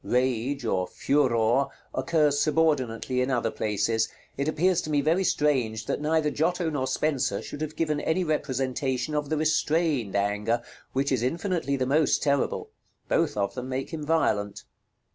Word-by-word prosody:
Rage, 125 +1 0
or 95 -4 0
Furor, 130 -2 +2 0.3
occurs 150 -4 +2
subordinately 135 -6 +1
in 125 - 0
other 120 -4 0
places. 110 +1 0 0.3
It 140 +2 -2
appears 175 +3 +2
to - - -6
me 150 -1 +2
very 165 +6 +2
strange 125 -10 +1
that - - -2
neither 155 0 +1
Giotto 170 +2 0
nor 130 -3 -1
Spenser 135 -11 0
should 145 - -8
have 155 0 -4
given 155 -3 0
any 180 +3 +1
representation 135 -2 -1
of 150 -1 -1
the 155 - 0
restrained 155 - +1
Anger, 105 +3 0 0.3
which 140 +1 0
is 130 -4 +1
infinitely 165 +2 -1
the 130 -1 0
most 145 +3 +2
terrible; 140 -2 0 0.4
both - - +1
of 100 -1 0
them 125 0 -6
make 130 +1 -3
him 155 -2 -4
violent. 105 -10 0
140 Hz, 160 wpm, -27 LUFS, 120-155 Hz, 0.4 s, Furor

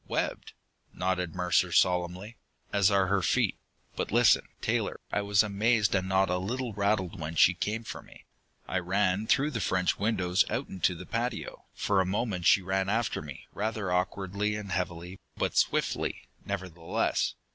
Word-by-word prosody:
"Webbed," - - -2 0.4
nodded 90 -2 -1
Mercer 90 0 +2
solemnly. 90 +5 +1 0.4
"As 100 -1 +4
are 100 -2 +3
her 95 +1 +1
feet. - - +1 0.4
But - - -3
listen, 120 +1 +4
Taylor. - - -1
I 105 - +1
was 100 +1 +3
amazed, 105 +1 +2
and 95 -1 0
not 95 0 +3
a 90 - 0
little 120 +5 -3
rattled 100 -3 0
when 80 +1 -5
she 90 - +6
came 105 +5 -3
for - - -7
me. - - -17 0.4
I 95 - 0
ran 95 +3 0
through 140 +5 +3
the 115 -5 -3
French 90 -1 +1
windows 95 -3 +2
out 125 +4 -2
into 95 -1 0
the - - -9
patio. 120 +1 -4
For 100 -2 +2
a - - 0
moment 95 -3 -1
she 95 - +5
ran 95 +1 0
after 110 0 0
me, 75 -3 -9
rather 110 -2 -2
awkwardly 95 +3 -1
and 105 -2 -6
heavily, 90 0 -3 0.2
but - - -1
swiftly, - - 0 0.2
nevertheless. 90 -4 -1
95 Hz, 165 wpm, -29 LUFS, 90-105 Hz, 0.4 s, she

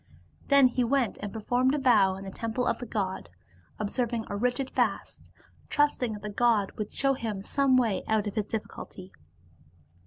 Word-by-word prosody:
Then 280 -2 +6
he 250 0 0
went 250 -1 0
and 205 - -4
performed 245 +5 +1
a - - 0
vow 215 -9 +4
in 190 - -8
the 195 - -7
temple 230 +4 -2
of - - 0
the 245 - -6
god, 190 - -3 0.5
ob 210 -1 -2
serving 235 -3 -1
a 200 - -3
rigid 250 +5 -1
fast, - - -2 0.4
trusting 290 -6 +1
that 210 -1 -9
the 210 - -4
god 220 -2 +2
would 210 -1 -6
show 275 0 +1
him 220 -6 -4
some 275 +2 +2
way 225 -7 +1
out 220 -1 +1
of 205 - -3
his 215 -2 -1
difficulty. 200 -3 -7
225 Hz, 185 wpm, -28 LUFS, 205-255 Hz, 0.5 s, Then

